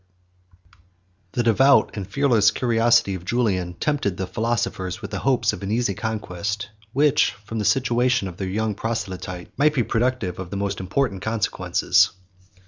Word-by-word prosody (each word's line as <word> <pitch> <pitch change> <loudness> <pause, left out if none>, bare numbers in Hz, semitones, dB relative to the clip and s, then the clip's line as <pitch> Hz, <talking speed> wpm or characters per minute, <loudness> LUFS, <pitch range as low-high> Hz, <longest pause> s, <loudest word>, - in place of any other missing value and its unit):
] 90 0 -34
The 120 - 0
devout 135 +5 +4
and 100 -4 -5
fearless 115 -4 +3
curiosity 115 -2 +2
of 90 -2 -6
Julian 95 -5 0
tempted 140 -11 -1
the 95 - -2
philosophers 110 -3 -2
with 100 - -8
the - - -3
hopes 135 -2 +1
of - - -7
an 100 - -4
easy 115 -2 +1
conquest; 105 -1 -4 0.2
which, 145 +3 +3
from 115 +1 -4
the 105 - -1
situation 125 -3 +2
of 90 -1 -9
their 95 -1 -3
young 110 +2 -1
proselyte, 95 -5 -5
might 150 +2 +3
be 125 - +2
productive 115 -6 -1
of 95 -2 -6
the 100 - -4
most 100 0 -2
important 95 +1 -1
consequences. 110 -1 +2
105 Hz, 160 wpm, -23 LUFS, 95-120 Hz, 0.2 s, devout